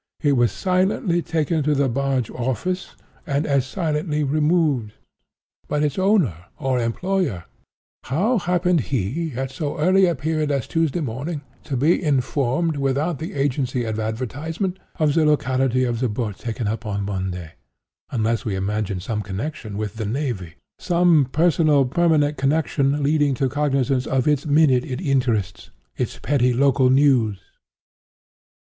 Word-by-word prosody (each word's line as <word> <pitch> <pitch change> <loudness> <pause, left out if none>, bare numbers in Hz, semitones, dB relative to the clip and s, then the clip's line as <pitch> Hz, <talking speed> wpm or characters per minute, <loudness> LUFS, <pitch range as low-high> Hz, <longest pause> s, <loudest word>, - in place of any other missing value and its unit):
It 145 - +4
was 120 -4 +3
silently 185 -1 +1
taken 160 -1 0
to 150 +1 +1
the 140 -1 +2
barge 135 -1 -1
office, 130 - -3 0.3
and 140 +2 0
as 140 -3 +1
silently 150 -2 -1
removed. 150 -6 +1 0.7
But 150 0 0
its 150 +3 -1
owner 175 - +2
or 130 -2 0
employer—how 175 - -2
happened 180 -1 +1
he, 135 - -2
at 130 +1 -3
so 145 +2 -4
early 185 +4 +4
a 170 - +1
period 155 +2 -1
as 140 -4 -1
Tuesday 165 0 0
morning, 140 +4 -4 0.2
to 135 - -2
be 155 +7 +3
informed, 140 +2 0
without 140 +3 0
the 160 - -5
agency 130 -3 0
of 110 -1 -3
advertisement, 145 - -3 0.2
of 155 -3 +2
the 160 0 +3
locality 130 -4 +2
of 120 -2 -1
the 125 -1 0
boat 105 -2 -3
taken 115 -1 -3
up 110 +2 -3
on 100 -2 -3
Monday, 90 -4 -4 0.6
unless 115 -1 0
we 105 -6 -2
imagine 100 0 -2
some 105 +4 -3
connexion 105 +1 -5
with 105 0 -4
the 110 - -3
navy—some 140 - 0
personal 155 -3 +3
permanent 150 0 +2
connexion 140 0 +1
leading 145 -1 +2
to 135 +2 0
cognizance 135 -2 0
of 135 0 0
its 150 0 +1
minute 145 -4 +4
in 130 -1 -5
interests—its 115 -9 -2
petty 125 -3 +2
local 135 0 +3
news? 130 -6 +3
140 Hz, 140 wpm, -22 LUFS, 120-155 Hz, 0.7 s, It